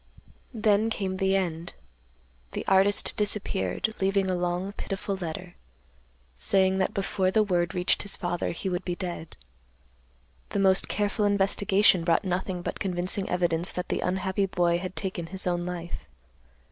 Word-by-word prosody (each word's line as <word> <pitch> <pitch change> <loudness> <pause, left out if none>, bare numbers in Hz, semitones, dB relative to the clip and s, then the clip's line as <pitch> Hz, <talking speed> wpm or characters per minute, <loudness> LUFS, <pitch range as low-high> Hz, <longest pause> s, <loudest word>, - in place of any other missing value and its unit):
"Then 215 0 +3
came 195 -4 -2
the 195 0 +2
end. 170 -3 -1 0.8
The - - -4
artist 195 +1 +4
disappeared, 210 0 +1
leaving 195 0 +2
a - - +1
long, 180 +2 -1
pitiful 195 -1 -4
letter, 180 0 -6 0.8
saying 190 - +2
that 190 - 0
before 195 -1 0
the 215 +3 +3
word 175 -4 0
reached 180 0 +2
his 200 - -2
father, 175 -1 -2
he 170 - -4
would 180 -1 -1
be 175 -1 -2
dead. 170 -2 -6 1.1
The 200 - -1
most 190 -1 +4
careful 205 +1 0
investigation 200 -2 +3
brought 165 +2 +2
nothing 180 0 -2
but - - -4
convincing 185 +1 -1
evidence 175 -1 0
that 180 - -4
the - - 0
unhappy 190 +2 0
boy 175 -2 +1
had 185 +1 -6
taken 185 -3 -3
his 190 +2 -3
own 175 -1 -1
life. 170 - -6
190 Hz, 150 wpm, -27 LUFS, 175-195 Hz, 1.1 s, artist